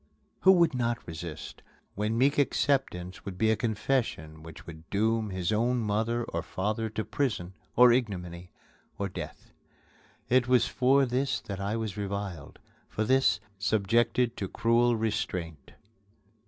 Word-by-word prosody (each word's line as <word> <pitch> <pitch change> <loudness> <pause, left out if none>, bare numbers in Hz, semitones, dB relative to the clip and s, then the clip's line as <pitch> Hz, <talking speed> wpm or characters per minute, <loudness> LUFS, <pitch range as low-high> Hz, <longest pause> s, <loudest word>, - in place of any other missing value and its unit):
Who 190 - +7
would 170 -5 +4
not 120 -1 0
resist 80 -1 -7 0.3
when 105 +3 -1
meek 140 +4 +3
acceptance 130 -11 0
would 95 -2 -7
be 110 +3 +3
a - - +3
confession 105 - -2
which 80 0 -11
would 80 -1 -11
doom 110 +1 +1
his 95 0 -2
own 120 +4 +1
mother 115 +2 0
or 85 -6 -3
father 105 +6 -2
to 110 0 -4
prison, 105 -10 -2 0.2
or 125 0 +8
ignominy, 90 -7 -3 0.5
or 100 - -2
death? 90 - -8 0.8
It 125 0 +3
was 125 -1 +4
for 135 +2 +3
this 130 +2 0
that 100 -2 -6
I 100 +2 -2
was 110 -3 -4
reviled, 100 -6 -5 0.3
for 110 - -2
this, 130 +4 +3 0.2
subjected 115 +3 +1
to 95 - -3
cruel 120 +4 +2
restraint. 90 -8 -3
110 Hz, 140 wpm, -28 LUFS, 95-120 Hz, 0.8 s, or